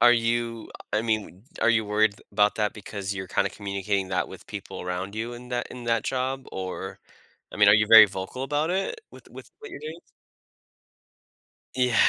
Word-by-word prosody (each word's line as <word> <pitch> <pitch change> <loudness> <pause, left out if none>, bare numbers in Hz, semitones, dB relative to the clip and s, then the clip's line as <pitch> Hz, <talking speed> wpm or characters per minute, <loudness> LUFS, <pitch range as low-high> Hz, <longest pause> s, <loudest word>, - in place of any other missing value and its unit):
Are 120 0 +8
you 115 -1 -1 0.2
I 105 +1 +2
mean, 110 -3 -2 0.2
are 115 - +5
you 110 -2 +3
worried 105 0 +2 0.2
about 105 0 +3
that 105 -1 0
because 100 -1 -5
you're 95 -1 -5
kinda - - +1
communicating 100 -1 -2
that 95 -1 -1
with - - -12
people - - -7
around 90 +3 -4
you 115 +2 -3
in 125 +1 -10
that 120 -1 -2
in 125 -1 -8
that 115 -1 +1
job, 130 0 -2
or, 95 0 -5 0.5
I - - -8
mean, 105 -1 +6
are - - +8
you 105 0 +4
very 110 -1 +11
vocal 95 +7 -5
about 150 +4 0
it 195 - -1
with - - -15
with - - -12
what 435 -1 -10
you're - - -8
doing? 160 +2 -7 1.8
Yeah. 125 -2 +2
110 Hz, 190 wpm, -26 LUFS, 100-125 Hz, 1.8 s, very